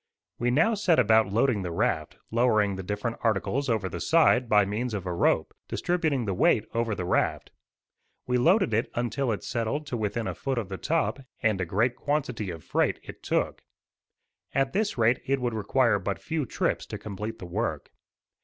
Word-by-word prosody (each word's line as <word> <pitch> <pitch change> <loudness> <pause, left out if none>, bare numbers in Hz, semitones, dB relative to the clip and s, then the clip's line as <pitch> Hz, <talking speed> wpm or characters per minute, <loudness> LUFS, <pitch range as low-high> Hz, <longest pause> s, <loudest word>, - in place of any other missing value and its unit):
We 120 - +1
now 160 - +3
set 195 -6 +2
about 110 -4 +4
loading 115 0 +2
the 90 - -3
raft, 85 - -1
lowering 110 -4 +2
the 95 - -5
different 105 +5 -3
articles 115 +5 0
over 110 -4 +1
the - - -6
side 130 -7 +4
by 105 -1 +5
means 110 +3 -2
of 95 -2 -4
a 90 - -2
rope, 85 - +1
distributing 160 -8 0
the 100 - -1
weight 105 +3 +3
over 115 -2 0
the 90 - -4
raft. - - 0 0.7
We 125 0 +1
loaded 175 - +3
it 110 +2 +1
until 120 +2 -1
it 105 - -3
settled 120 +6 -2
to 125 - -3
within 110 +1 -2
a - - -2
foot 135 -2 -3
of 110 -5 -2
the 95 - -5
top, 160 -2 0 0.2
and 110 -4 +2
a - - 0
great 115 +8 +1
quantity 130 -8 -2
of 80 -4 -7
freight - - 0
it - - -11
took. - - -1 0.9
At 135 0 +1
this 205 -3 0
rate 115 +2 +3
it 135 0 +1
would 120 -2 -1
require 110 +1 +2
but 100 -1 -2
few 155 -5 -3
trips - - -1
to - - -5
complete 105 +2 -6
the - - -8
work. 85 - -3
115 Hz, 190 wpm, -27 LUFS, 105-135 Hz, 0.9 s, by